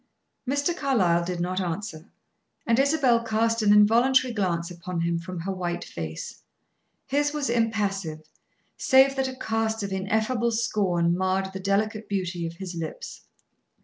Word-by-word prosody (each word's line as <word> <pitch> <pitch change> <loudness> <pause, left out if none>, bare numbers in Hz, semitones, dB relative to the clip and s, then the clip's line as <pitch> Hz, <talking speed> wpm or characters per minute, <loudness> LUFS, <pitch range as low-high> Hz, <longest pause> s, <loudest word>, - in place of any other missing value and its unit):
Mr. 285 +5 0
Carlyle 195 - +2
did 175 0 -3
not 185 +2 -1
answer, 170 -2 -5 0.6
and 230 +1 +2
Isabel 270 -5 +3
cast 225 0 +1
an 205 -1 +4
involuntary 240 +5 +5
glance 175 -4 -1
upon 175 0 -5
him 170 0 0
from 180 0 -6
her 195 +3 -3
white 175 -2 -3
face. 80 -1 -7 0.6
His 290 +2 0
was 290 -5 -1
impassive, 200 -9 -1 0.5
save 265 +1 +5
that 265 -1 0
a 260 - -6
cast 220 -2 -1
of 195 -1 -3
ineffable 220 +5 0
scorn 185 -7 +1
marred 190 +1 -1
the 190 - -5
delicate 210 +3 -1
beauty 180 -4 -2
of 165 - -7
his 185 0 -7
lips. 165 -2 -7
200 Hz, 150 wpm, -26 LUFS, 175-235 Hz, 0.6 s, involuntary